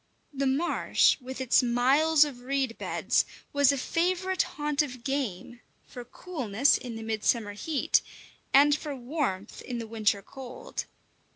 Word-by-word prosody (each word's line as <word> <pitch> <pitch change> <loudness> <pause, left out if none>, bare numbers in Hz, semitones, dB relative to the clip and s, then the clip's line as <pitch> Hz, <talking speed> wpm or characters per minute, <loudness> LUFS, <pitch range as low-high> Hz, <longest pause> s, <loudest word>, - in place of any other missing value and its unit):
The 275 0 -1
marsh, 290 +6 +2
with 260 +1 -7
its 260 0 +4
miles 275 +6 +4
of 275 -4 -7
reed 265 -1 -2
beds, - - +1 0.3
was 285 -1 +5
a 280 - -1
favourite 365 +6 0 0.2
haunt 295 -1 +1
of 255 -5 -5
game, 245 -4 -3 0.3
for 245 - -9
coolness 255 - 0
in 245 -3 -5
the 225 - -6
midsummer 220 -1 0
heat, 285 +8 +1 0.5
and 285 +1 +6
for 300 -2 -5
warmth 245 - -3
in 245 - -5
the 230 - -4
winter 215 -2 0
cold. 270 - -7
265 Hz, 145 wpm, -28 LUFS, 235-295 Hz, 0.5 s, and